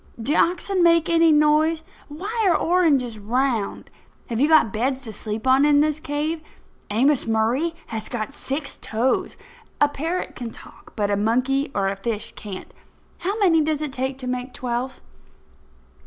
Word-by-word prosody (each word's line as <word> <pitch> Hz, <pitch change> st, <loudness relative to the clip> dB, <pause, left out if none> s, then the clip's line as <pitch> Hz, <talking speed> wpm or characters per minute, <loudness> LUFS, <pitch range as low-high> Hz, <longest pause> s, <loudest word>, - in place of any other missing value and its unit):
Do 245 Hz, +7 st, 0 dB
oxen 360 Hz, +3 st, +2 dB
make 335 Hz, -1 st, +4 dB
any 330 Hz, -1 st, +5 dB
noise? 305 Hz, +2 st, +3 dB, 0.2 s
Why 405 Hz, +10 st, -3 dB
are 340 Hz, -, +4 dB
oranges 285 Hz, -11 st, +2 dB
round? 235 Hz, 0 st, -1 dB, 0.4 s
Have 230 Hz, +1 st, -1 dB
you 290 Hz, -, +5 dB
got 310 Hz, -10 st, +4 dB
beds 260 Hz, +4 st, -1 dB
to 220 Hz, -4 st, -7 dB
sleep 215 Hz, +2 st, -4 dB
on 260 Hz, +2 st, +5 dB
in 295 Hz, -1 st, +5 dB
this 305 Hz, 0 st, +1 dB
cave? 310 Hz, +1 st, -2 dB, 0.5 s
Amos 255 Hz, +6 st, +2 dB
Murray 235 Hz, +9 st, +1 dB
has 220 Hz, -1 st, -5 dB
got 215 Hz, -3 st, -4 dB
six 275 Hz, +2 st, -4 dB
toes. 235 Hz, +4 st, -1 dB, 0.4 s
A 290 Hz, -, +5 dB
parrot 325 Hz, +5 st, -3 dB
can 240 Hz, -2 st, -5 dB
talk, -, -, -14 dB
but 205 Hz, -2 st, 0 dB
a -, -, +3 dB
monkey 255 Hz, +7 st, +1 dB
or 195 Hz, -1 st, +1 dB
a 195 Hz, -, -1 dB
fish 210 Hz, +2 st, -4 dB
can't. 200 Hz, -3 st, -8 dB, 0.5 s
How 395 Hz, +4 st, -2 dB
many 330 Hz, -5 st, +5 dB
does 305 Hz, 0 st, 0 dB
it 290 Hz, -3 st, -4 dB
take 265 Hz, 0 st, -2 dB
to 255 Hz, -2 st, -5 dB
make 250 Hz, 0 st, -4 dB
twelve?" 250 Hz, +1 st, -3 dB
270 Hz, 165 wpm, -23 LUFS, 230-315 Hz, 0.5 s, any